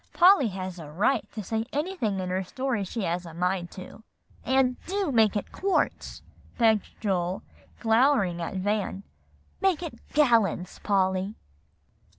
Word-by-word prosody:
"Polly 360 -7 +6
has 185 -2 -5
a 155 -3 -8
right 215 - 0
to 215 - -5
say 220 +3 -1
anything 290 - -1
in 185 -1 -3
her 190 +1 0
stories 240 0 -2
she 225 +2 -4
has 175 0 -1
a 165 -2 -10
mind 180 0 -1
to." 185 +3 -10 0.4
"And 260 0 +1
do 385 -3 -1
make 220 -3 +4
it 205 - -3
quarts," 390 0 -1 0.3
begged 220 -4 +2
Joel, 185 -3 -1 0.4
glowering 225 -6 +3
at 170 - -4
Van. 200 0 -1 0.6
"Make 365 -4 +2
it 330 - -7
gallons, 230 - +2
Polly." 190 0 +1
210 Hz, 145 wpm, -27 LUFS, 185-260 Hz, 0.6 s, Polly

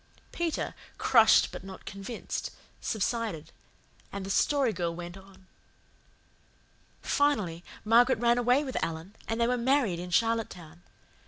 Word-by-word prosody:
Peter, 340 -2 -2 0.2
crushed 225 -4 +5
but - - -8
not 190 -1 -10
convinced, 200 +4 -5 0.3
subsided, 220 -6 -2 0.6
and 200 -1 -5
the 195 - -3
Story 270 +1 +2
Girl 170 -3 -2
went 175 +1 -7
on. 195 0 -16 1.6
"Finally, 210 - +1 0.2
Margaret 240 +3 +5
ran 240 +1 +3
away 250 +4 +3
with 265 -3 -3
Alan, 165 +5 -5
and 225 +1 -2
they 235 - +3
were 250 +1 +1
married 240 -8 +2
in 180 +1 -6
Charlottetown. 180 -6 -1
220 Hz, 130 wpm, -29 LUFS, 180-245 Hz, 1.6 s, crushed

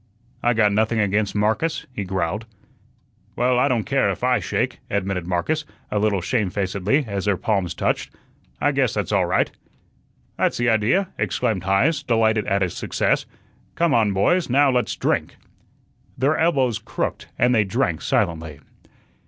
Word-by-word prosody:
"I 120 0 +2
got 105 -2 +4
nothing 110 +2 +1
against 105 0 0
Marcus," 110 +10 0
he 105 - -3
growled. 95 +4 -2 0.9
"Well, 125 0 +2
I 130 - +3
don't 120 -5 +1
care - - +1
if - - -4
I - - +3
shake," - - -2
admitted 95 -3 -2
Marcus, 120 - -1 0.3
a 105 - +1
little 100 -3 +1
shamefacedly, 100 - 0
as 100 -2 -3
their 100 -3 +2
palms 95 -5 -1
touched. - - -1 0.5
"I 145 - +2
guess 135 -5 +1
that's 105 0 -2
all 95 -4 +2
right." 90 - +1 0.9
"That's - - +1
the 120 0 +2
idea," 115 - +2
exclaimed 95 -1 -1
Heise, 135 - +2
delighted 110 -5 +1
at 100 -2 +1
his 90 - -2
success. - - 0 0.5
"Come 170 -3 +2
on, 110 -5 +3
boys, 145 - +2
now 140 +2 +4
let's 125 -1 0
drink." - - -1 0.8
Their 140 +5 +2
elbows 135 -9 +1
crooked - - -4
and 125 +1 +3
they 110 -3 +4
drank 95 - -1
silently. 80 -3 -1
110 Hz, 155 wpm, -22 LUFS, 95-125 Hz, 0.9 s, got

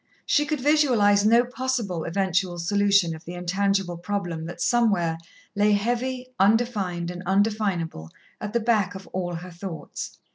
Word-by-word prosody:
She 295 0 +2
could 305 -2 -1
visualize 245 -8 +4
no 235 +2 +5
possible 245 -9 -2
eventual 185 0 0
solution 200 -1 +2
of 160 - -12
the 175 - -8
intangible 195 0 0
problem 175 -3 -3
that 175 +1 -8
somewhere 200 -9 +2 0.4
lay 205 +1 +3
heavy, 245 +4 -1
undefined 195 -5 +1
and 180 0 -7
undefinable, 195 - 0 0.3
at 210 0 -5
the 235 - +2
back 215 -4 +1
of 190 - -8
all 175 -2 -2
her 180 +2 -8
thoughts. 170 -1 -7
200 Hz, 145 wpm, -25 LUFS, 175-225 Hz, 0.4 s, no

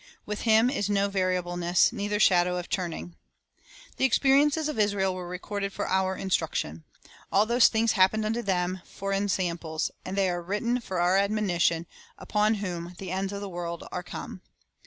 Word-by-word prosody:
With 210 0 -4
Him 220 +3 +5
"is 205 -7 -1
no 200 0 +2
variable 185 -2 -1
ness, 175 0 +3
neither 205 +1 -2
shadow 180 -3 +4
of 180 - -5
turning." 170 - -3
3 85 - -22 0.8
The - - +2
experiences 280 +4 +3
of 300 -7 -3
Israel 200 -2 +1
were 180 -1 -6
recorded 200 +3 -4
for - - -3
our 190 0 +1
instruction. 85 - -2 0.5
"All 205 +2 +4
those 235 +2 +5
things 225 0 +2
happened 215 +2 +3
unto 225 +2 -1
them 185 -2 -1
for 195 0 -5
ensamples, 175 -5 -1
and 190 +2 -5
they 195 -1 +3
are 175 0 -3
written 210 +7 -1
for 185 -5 -4
our 180 +2 +3
admonition, 195 -5 +1 0.3
upon 210 +1 +1
whom 180 -3 -5
the 185 -2 -6
ends 190 +1 -2
of 200 0 -5
the 200 - -4
world 170 -1 -5
are 180 - -3
come." 180 +1 -8
190 Hz, 180 wpm, -27 LUFS, 180-210 Hz, 0.8 s, Him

